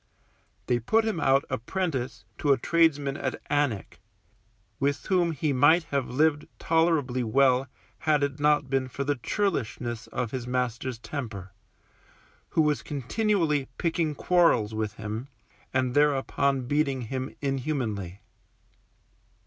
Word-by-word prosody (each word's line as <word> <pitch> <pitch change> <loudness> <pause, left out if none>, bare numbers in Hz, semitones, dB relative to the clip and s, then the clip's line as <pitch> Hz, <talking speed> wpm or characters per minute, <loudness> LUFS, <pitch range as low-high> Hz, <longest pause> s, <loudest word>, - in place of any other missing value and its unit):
They 120 -1 +1
put 220 - +2
him 220 -6 -1
out 135 -2 +3
apprentice 135 -1 -3
to 145 - +2
a 135 - +5
tradesman 145 -2 +2
at - - -3
Alnwick, 145 -9 0 0.8
with 140 0 0
whom 180 -3 +2
he 150 -1 -1
might 145 +6 +5
have 140 -3 0
lived 150 +3 +1
tolerably 160 -6 +1
well 130 +3 +3 0.3
had 150 -1 +2
it 140 0 -2
not 150 -1 +3
been 135 -1 0
for 140 +2 -4
the 145 +1 0
churlishness 125 - -2
of 120 -3 -3
his 125 -2 -4
master's 125 0 -2
temper, 110 -7 -6 1.0
who 160 - +2
was 150 -1 +1
continually 150 - 0
picking 165 -3 0
quarrels 165 -14 +3
with 110 -1 -2
him, 110 +4 -5 0.4
and 130 -1 0
thereupon 140 -2 +2
beating 140 -1 0
him 130 +3 -4
inhumanly. 125 - -2
140 Hz, 125 wpm, -27 LUFS, 125-155 Hz, 1.0 s, a